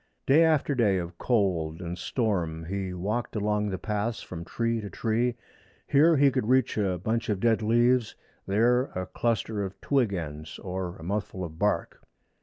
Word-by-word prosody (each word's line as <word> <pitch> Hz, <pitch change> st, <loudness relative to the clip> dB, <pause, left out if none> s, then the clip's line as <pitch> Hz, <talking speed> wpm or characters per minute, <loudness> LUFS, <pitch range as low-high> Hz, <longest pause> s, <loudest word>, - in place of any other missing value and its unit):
Day 150 Hz, +5 st, +6 dB
after 155 Hz, -3 st, +2 dB
day 110 Hz, -7 st, +3 dB
of 85 Hz, -1 st, -5 dB
cold 90 Hz, -9 st, 0 dB
and 85 Hz, -1 st, -4 dB
storm 90 Hz, -8 st, -1 dB
he 95 Hz, +1 st, -3 dB
walked 105 Hz, +8 st, -3 dB
along 105 Hz, 0 st, 0 dB
the 95 Hz, -, -2 dB
paths 105 Hz, +4 st, -2 dB
from 85 Hz, -2 st, -7 dB
tree 115 Hz, +5 st, -1 dB
to 105 Hz, -, -6 dB
tree. 115 Hz, +3 st, 0 dB, 0.5 s
Here 155 Hz, +3 st, +5 dB
he 140 Hz, 0 st, +5 dB
could 130 Hz, -4 st, -1 dB
reach 130 Hz, -1 st, +3 dB
a 95 Hz, -4 st, 0 dB
bunch 110 Hz, +7 st, -2 dB
of 105 Hz, -3 st, 0 dB
dead 115 Hz, +1 st, +2 dB
leaves, 120 Hz, +1 st, +2 dB, 0.3 s
there 120 Hz, +6 st, +3 dB
a 90 Hz, 0 st, -2 dB
cluster 110 Hz, -2 st, -1 dB
of 95 Hz, 0 st, -6 dB
twig 130 Hz, -7 st, +1 dB
ends, 75 Hz, -4 st, -5 dB
or 90 Hz, -1 st, -4 dB
a 80 Hz, -, -12 dB
mouthful 95 Hz, 0 st, -3 dB
of 80 Hz, -2 st, -7 dB
bark. 105 Hz, 0 st, 0 dB
105 Hz, 175 wpm, -27 LUFS, 90-120 Hz, 0.5 s, Day